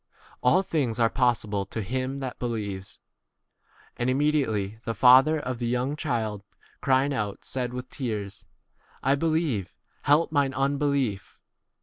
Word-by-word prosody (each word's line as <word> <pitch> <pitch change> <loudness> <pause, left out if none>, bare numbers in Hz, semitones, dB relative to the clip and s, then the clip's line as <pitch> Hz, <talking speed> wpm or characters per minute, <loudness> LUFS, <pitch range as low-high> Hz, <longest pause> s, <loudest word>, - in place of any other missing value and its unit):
All 170 +10 +4
things 135 - -1
are 115 -1 +3
possible 115 -6 +1
to 110 - -5
24 110 +5 -4
him 135 +2 -4
that 130 -2 -5
believes. 105 -6 -4 1.0
And 120 +1 0
immedi 145 +3 +2
ately 105 0 -3
the 115 -1 -4
father 130 +7 +6
of 125 -4 -4
the 120 - -1
young 125 +4 0
child 115 -9 -2 0.4
crying 135 +1 +2
out 105 -6 -3
said 125 -2 -2
with 125 0 -6
tears, 105 -7 -4 0.6
I - - +1
25 140 - -1
believe,P 155 - 0 0.3
help 150 +3 +4
mine 140 -3 +1
unbelief. 140 -6 0
125 Hz, 145 wpm, -26 LUFS, 110-140 Hz, 1.0 s, father